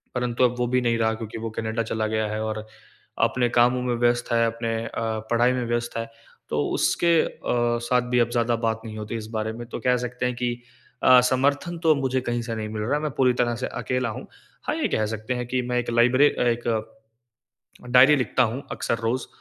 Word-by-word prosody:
परंतु 125 Hz, 0 st, 0 dB
अब 125 Hz, -1 st, +3 dB
वो 120 Hz, -, +1 dB
भी 125 Hz, +1 st, +1 dB
नहीं 120 Hz, -1 st, +1 dB
रहा 110 Hz, -1 st, +1 dB
क्योंकि 110 Hz, 0 st, -7 dB
वो 115 Hz, 0 st, -4 dB
कनाडा 110 Hz, +1 st, -1 dB
चला 110 Hz, -1 st, -1 dB
गया 110 Hz, 0 st, -1 dB
है 110 Hz, +1 st, -3 dB
और 110 Hz, 0 st, -4 dB, 0.6 s
अपने 125 Hz, -1 st, +2 dB
कामों 125 Hz, +1 st, +4 dB
में 125 Hz, -1 st, 0 dB
व्यस्त 120 Hz, +1 st, +1 dB
है, 115 Hz, 0 st, +3 dB
अपने 115 Hz, 0 st, -2 dB
अ, -, -, -5 dB, 0.4 s
पढ़ाई 120 Hz, +1 st, +4 dB
में 125 Hz, -1 st, -2 dB
व्यस्त 120 Hz, 0 st, -2 dB
है। 115 Hz, 0 st, -4 dB, 0.4 s
तो -, -, 0 dB
उसके 170 Hz, -1 st, +3 dB
अ, -, -, -3 dB, 0.6 s
साथ 125 Hz, 0 st, +3 dB
भी 125 Hz, -, +3 dB
अब 120 Hz, -1 st, +2 dB
ज़्यादा 120 Hz, 0 st, +1 dB
बात 110 Hz, 0 st, -1 dB
नहीं 110 Hz, -1 st, -7 dB
होती 110 Hz, +1 st, -5 dB
इस 110 Hz, -1 st, -7 dB
बारे 110 Hz, 0 st, -2 dB
में। 120 Hz, +1 st, -8 dB
तो -, -, -5 dB
कह 125 Hz, 0 st, +2 dB
सकते 125 Hz, +1 st, -4 dB
हैं 125 Hz, 0 st, -1 dB
कि 120 Hz, 0 st, -1 dB, 0.5 s
अ, 130 Hz, 0 st, +8 dB
समर्थन 140 Hz, +6 st, 0 dB
तो 160 Hz, -2 st, +5 dB
मुझे 130 Hz, -2 st, 0 dB
कहीं 120 Hz, -1 st, -2 dB
से 115 Hz, -, -3 dB
नहीं 110 Hz, -1 st, -4 dB
मिल 110 Hz, 0 st, -4 dB
रहा 130 Hz, +7 st, 0 dB
है, 150 Hz, -, -1 dB
मैं 155 Hz, -1 st, -2 dB
पूरी 130 Hz, -2 st, +4 dB
तरह 120 Hz, -1 st, 0 dB
से -, -, 0 dB
अकेला 125 Hz, -1 st, -2 dB
हूँ। 110 Hz, -, -7 dB, 0.4 s
हाँ, -, -, -1 dB
ये -, -, 0 dB
कह 110 Hz, -, 0 dB
सकते 110 Hz, +3 st, -3 dB
हैं 125 Hz, 0 st, -3 dB
कि 125 Hz, +1 st, 0 dB
मैं 125 Hz, -, 0 dB
एक 120 Hz, -, -3 dB
लाइब्रे 125 Hz, +5 st, +5 dB
अ, -, -, -4 dB
एक, 120 Hz, -1 st, 0 dB, 1.3 s
डायरी 130 Hz, +4 st, +7 dB
लिखता 130 Hz, -1 st, +1 dB
हूँ 125 Hz, +3 st, -1 dB
अक्सर 115 Hz, -, -2 dB
रोज़। 120 Hz, +3 st, -1 dB
120 Hz, 230 wpm, -24 LUFS, 115-125 Hz, 1.3 s, अ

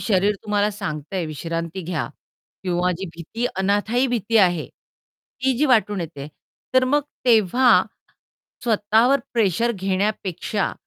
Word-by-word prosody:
शरीर 205 Hz, 0 st, +2 dB
तुम्हाला 210 Hz, 0 st, +1 dB
सांगतय 185 Hz, -3 st, -4 dB
विश्रांती 165 Hz, +3 st, -4 dB
घ्या. 165 Hz, -3 st, -3 dB, 0.5 s
किंवा 180 Hz, -1 st, 0 dB
जी 195 Hz, -, -4 dB
भीती 225 Hz, +9 st, -3 dB
अनाथायी 205 Hz, +6 st, +1 dB
भीती 230 Hz, -2 st, 0 dB
आहे, 175 Hz, -5 st, +3 dB
ती 265 Hz, +1 st, -6 dB
जी 300 Hz, -, +3 dB
वाटून 210 Hz, -6 st, +2 dB
येते. 150 Hz, -4 st, -6 dB, 0.5 s
तर 260 Hz, 0 st, +5 dB
मग 290 Hz, +3 st, +2 dB, 0.2 s
तेव्हा 240 Hz, +2 st, +5 dB, 0.8 s
स्वतःवर 225 Hz, +4 st, +3 dB
प्रेशर 230 Hz, +1 st, +2 dB
घेण्यापेक्षा, 195 Hz, 0 st, -1 dB
205 Hz, 115 wpm, -22 LUFS, 180-230 Hz, 0.8 s, तर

